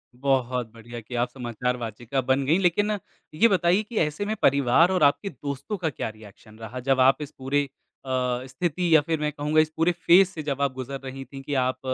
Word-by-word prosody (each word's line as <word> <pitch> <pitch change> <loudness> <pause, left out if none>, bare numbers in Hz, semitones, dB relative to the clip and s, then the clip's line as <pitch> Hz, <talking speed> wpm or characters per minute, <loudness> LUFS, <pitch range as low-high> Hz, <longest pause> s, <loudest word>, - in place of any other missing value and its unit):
बहुत 125 -3 0
बढ़िया 120 +1 -9
कि 120 +3 -9
आप 120 +1 0
समाचार 125 0 -3
वाचिका 120 +3 -3
बन 130 +2 +1
गईं, 160 +7 +3
लेकिन 195 +3 +2 0.4
ये 215 +10 +5
बताइए 185 -1 +2
कि 220 +1 -8
ऐसे 155 +5 -1
में 215 +1 -2
परिवार 140 +5 +4
और 185 -4 +2
आपके 145 +8 +3
दोस्तों 140 - -5
का 170 -4 -1
क्या 130 - -4
रिएक्शन 110 0 -15
रहा? 115 +3 -7
जब 135 +1 +1
आप 130 +3 +4
इस 145 - -6
पूरे 135 +2 0 0.4
अ, 125 -1 -1
स्थिति 170 +4 0
या - - +8
फिर 160 +1 -2
मैं 150 0 -1
कहूँगा 150 +1 0
इस 155 - -1
पूरे 165 +2 +3
फेज़ 175 +2 +5
से 170 -4 -7
जब 140 -1 -3
आप 140 -2 +1
गुज़र 130 +1 -6
रही 135 0 -7
थी 135 0 -10
कि 145 +2 -5
आप 130 0 -3
135 Hz, 215 wpm, -25 LUFS, 125-165 Hz, 0.4 s, या